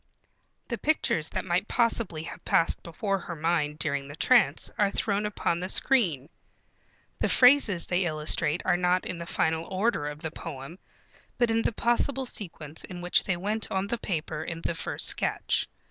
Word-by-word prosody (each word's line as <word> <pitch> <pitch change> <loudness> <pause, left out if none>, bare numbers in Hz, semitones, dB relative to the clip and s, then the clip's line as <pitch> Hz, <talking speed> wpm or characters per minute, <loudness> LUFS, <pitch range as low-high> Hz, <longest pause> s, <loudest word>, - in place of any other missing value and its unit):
The 235 -3 -3
pictures 185 - 0
that - - -4
might 185 +3 0
possibly 230 -9 0
have 170 - -9
passed 165 - +2
before 195 +4 -2
her 170 -1 -7
mind 155 -2 0
during 140 -3 -1
the 145 - -9
trance 245 +8 +3
are 205 -1 +2
thrown 205 +1 0
upon 170 -4 -1
the 185 +1 -4
screen. 180 - +2 0.9
The - - +1
phrases 250 -9 +5
they 180 +1 0
illustrate 155 0 0
are 175 - +3
not 180 +1 +1
in 175 - -4
the 170 - -7
final 160 0 0
order 190 -5 -1
of 150 0 -7
the 160 -2 -4
poem, 155 +2 -8 0.6
but 240 -2 +2
in 225 0 +2
the - - 0
possible 240 +4 +1
sequence 165 - -4
in 180 -1 -8
which 175 0 +2
they 180 - 0
went 210 +4 -2
on 190 0 -1
the 235 +3 -3
paper 160 -5 -3
in 165 -1 -5
the - - -1
first 165 - -1
sketch. - - +1
180 Hz, 175 wpm, -27 LUFS, 160-215 Hz, 0.9 s, phrases